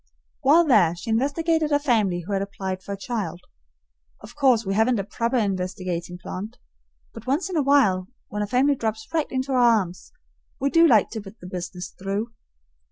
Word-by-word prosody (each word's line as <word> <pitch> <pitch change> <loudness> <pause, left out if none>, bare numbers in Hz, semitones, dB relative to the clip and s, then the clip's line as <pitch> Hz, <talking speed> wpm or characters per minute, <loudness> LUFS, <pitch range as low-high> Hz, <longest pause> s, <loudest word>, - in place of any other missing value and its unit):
While 310 +6 +5
there, 200 - +4
she 175 +6 -5
investigated 310 +6 +1
a 290 - +5
family 220 - +1
who 190 +4 -5
had 195 - 0
applied 190 -1 -4
for 200 - -9
a 200 - -3
child. 195 -6 -4 0.8
Of 215 +3 -12
course 255 -6 +3
we 195 - -1
haven't 225 +4 +3
a 200 - -1
proper 230 +5 -1
investigating 185 -4 -2
plant, 200 +5 -7 0.6
but 225 +2 -11
once 310 +9 0
in - - -3
a 310 - +3
while, 255 -10 +3 0.2
when 210 - -4
a 205 - -1
family 260 +6 +3
drops 220 -4 -3
right 315 -2 0
into 260 +1 -2
our 255 - +2
arms, 215 -7 +2 0.5
we 275 +1 0
do 335 0 +6
like 220 -8 +4
to 220 - -5
put 200 +2 -13
the - - -12
business 180 0 -6
through. 200 +4 -3
220 Hz, 190 wpm, -24 LUFS, 190-265 Hz, 0.8 s, do